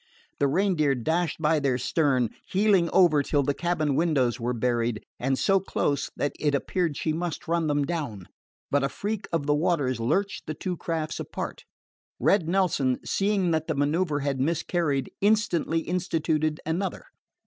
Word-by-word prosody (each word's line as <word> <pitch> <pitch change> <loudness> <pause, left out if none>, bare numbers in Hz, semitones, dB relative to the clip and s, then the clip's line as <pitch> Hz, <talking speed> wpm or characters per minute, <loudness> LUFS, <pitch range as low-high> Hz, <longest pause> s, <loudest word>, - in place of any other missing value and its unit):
The 140 - +3
Reindeer 155 -3 +2
dashed 160 +7 -1
by 155 0 +2
their 135 -3 +1
stern, 130 -3 +1 0.2
heeling 190 -3 +3
over 165 -6 +5
till 140 0 +1
the 145 +1 +1
cabin 155 -3 0
windows 135 -6 +1
were 120 +1 -1
buried, 120 -2 -1
and 135 +1 0
so 195 +5 +3
close 145 -6 -1
that 145 - -1
it 145 -2 +1
appeared 165 +1 -1
she 155 - -1
must 170 0 -4
run 165 -1 +1
them 145 -1 +1
down. 140 - -4 0.4
But 145 0 +2
a 140 - +1
freak 205 +3 -4
of 165 -4 0
the 145 - +3
waters 145 -6 +1
lurched 190 - -1
the 155 - -3
two 180 +4 -3
crafts 160 -2 -3
apart. - - -6 0.5
Red 180 -5 +2
Nelson, 165 -9 +1
seeing 195 -3 +1
that 160 -1 0
the 160 - -1
manoeuver 145 +1 +1
had 140 -1 -1
miscarried, 155 -1 0
instantly 200 -6 +2
instituted 160 -3 -1
another. 170 +5 -2
155 Hz, 160 wpm, -26 LUFS, 140-175 Hz, 0.5 s, over